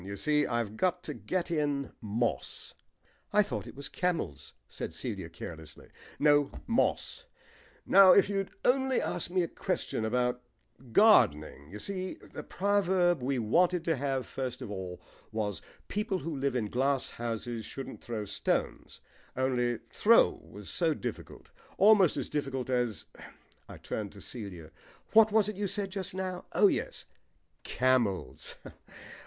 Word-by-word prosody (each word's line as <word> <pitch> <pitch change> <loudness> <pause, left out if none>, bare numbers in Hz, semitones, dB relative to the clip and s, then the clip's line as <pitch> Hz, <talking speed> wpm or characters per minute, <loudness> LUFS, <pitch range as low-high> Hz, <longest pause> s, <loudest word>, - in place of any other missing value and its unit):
You 100 +1 -6
see, 150 +3 +2
I've 115 -3 -2
got 180 +2 +1
to - - -5
get 180 -2 -3
in 145 -4 -1
'moss.'" 110 - -2 0.6
"I 210 0 +5
thought 110 - -5
it - - -10
was 140 0 -6
'camels,'" 170 - -2
said - - -6
Celia - - -5
carelessly. 80 -2 -10 0.3
"No, 145 -1 +4 0.2
'moss.' 255 - 0 0.6
Now 195 -1 +8
if 200 - +5
you'd 195 -1 -1 0.2
only 265 0 +3
asked 175 - -2
me 180 0 +1
a - - -1
question 110 - -3
about 125 +2 0 0.5
gardening 75 - +4
You 105 - -8
see, 185 - -4
the - - -10
proverb 185 -5 +1
we 130 +2 0
wanted 170 +10 +2
to 165 -1 +1
have 135 -1 -1
first 130 -2 -5
of 105 - -7
all 95 -2 -6 0.3
was 105 -3 -2 0.3
'People 210 -2 -1
who 165 -3 -4
live 135 -1 -1
in 120 -4 0
glass 130 +5 +1
houses 115 0 -4
shouldn't 135 +5 -7
throw 110 -3 -4
stones,' 100 - -2 0.4
only 125 -2 +1 0.2
'throw' 230 +2 +5
was - - -8
so - - +1
difficult. - - -7 0.3
Almost 200 -4 +6
as - - -2
difficult 135 -3 -3
as 120 -8 -1 0.3
" - - -32
I - - -9
turned 105 -3 -5
to 100 - -12
Celia. 95 -9 -7 0.4
"What 220 -1 +7
was 215 -1 +4
it 215 -2 -4
you 205 0 -1
said 195 0 -2
just 190 -1 -3
now? 185 -1 -4
Oh - - +5
yes, - - 0 0.6
camels. 115 - 0
140 Hz, 150 wpm, -30 LUFS, 115-185 Hz, 0.6 s, Now